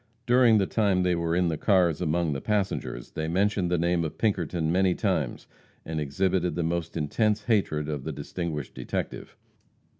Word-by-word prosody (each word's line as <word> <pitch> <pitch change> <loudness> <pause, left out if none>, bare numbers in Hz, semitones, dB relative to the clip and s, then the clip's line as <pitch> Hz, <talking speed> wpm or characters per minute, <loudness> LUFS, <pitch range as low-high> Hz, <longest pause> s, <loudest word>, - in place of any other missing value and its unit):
During 120 -2 +5
the 100 - +2
time 100 -3 +1
they 90 -1 +2
were 85 -1 0
in 90 -1 +2
the 80 - -3
cars 90 -6 +3
among 85 -1 0
the 70 - -4
passengers, 100 - -2
they 80 0 -3
mentioned 95 +1 +1
the 90 - +1
name 85 0 +1
of 80 - -5
Pinkerton 85 -6 0
many 95 0 +3
times, 85 - -1 0.4
and 80 -1 -3
exhibited 90 +5 0
the 85 - -1
most 85 0 -2
intense 105 +8 0
hatred 95 -10 +1
of 75 -3 -3
the - - -3
distinguished 75 -1 -5
detective. - - -5
85 Hz, 175 wpm, -27 LUFS, 80-95 Hz, 0.4 s, During